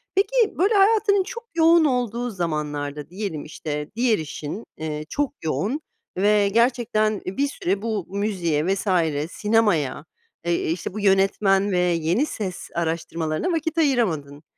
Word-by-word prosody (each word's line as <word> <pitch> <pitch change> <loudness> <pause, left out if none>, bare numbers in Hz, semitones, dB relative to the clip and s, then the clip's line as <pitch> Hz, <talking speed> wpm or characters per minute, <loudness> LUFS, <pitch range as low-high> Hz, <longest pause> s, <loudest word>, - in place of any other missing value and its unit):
Peki, 455 +3 +2
böyle, 395 +6 +3
hayatının 405 -1 +4
çok 470 +4 -7
yoğun 330 0 +5
olduğu 245 -2 0
zamanlarda 150 -5 -3
diyelim, 185 -5 -4
işte, 150 -1 -5
diğer 235 -2 +3
işin, 155 +6 -6
eee, 155 -1 -4
çok 290 -1 -1
yoğun 220 - -1 0.4
ve 205 +1 +3
gerçekten, 230 -2 +1
eee, 185 - -5
bir 280 - +2
süre 195 -7 -2
bu 220 -5 -2
müziğe 185 -6 -1
vs. 195 +2 -1 0.4
sinemaya, 205 - +1 0.4
eee, 170 -2 0
işte 175 +2 -4
bu 215 - -4
yönetmen 195 0 +3
ve 180 - +1
yeni 175 - +1
ses 195 -10 -5
araştırmalarına 165 - -1
vakit 320 0 -1
ayıramadın. 170 - 0
200 Hz, 135 wpm, -23 LUFS, 165-250 Hz, 0.4 s, yoğun